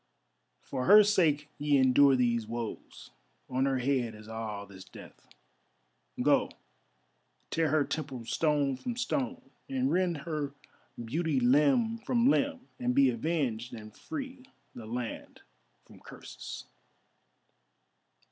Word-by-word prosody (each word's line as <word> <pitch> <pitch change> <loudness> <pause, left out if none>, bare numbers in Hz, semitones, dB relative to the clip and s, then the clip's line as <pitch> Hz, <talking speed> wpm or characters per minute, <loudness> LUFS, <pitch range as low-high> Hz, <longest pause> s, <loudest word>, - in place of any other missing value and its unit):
For 125 - -4
her 210 +2 +9
sake 160 -8 +2
ye 145 -1 +3
endure 135 +1 +5
these 120 -3 +1
woes, 115 -1 -7 0.4
on 130 +1 0
her 135 -1 +1
head 125 -3 0
is 105 0 -13
all 110 -2 -5
this 95 -2 -12
death. - - -14 0.9
Go, - - +3 1.0
tear 160 -1 +1
her 155 0 +3
temple 135 -6 -5
stone 145 -1 +1
from 240 - -5
stone, 255 +1 -3 0.2
and 265 0 0
rend 180 -2 +1
her 150 -4 -3 0.5
beauty 155 +3 0
limb 150 - +3
from 235 +1 +1
limb 275 -3 0
and 250 0 0
be 275 -1 +5
avenged 135 - -2
and 110 -1 -11
free 270 -4 -7 0.3
the 115 -2 -9
land 120 0 -6 0.4
from - - -17
curses." - - -9
145 Hz, 120 wpm, -30 LUFS, -, 1.0 s, her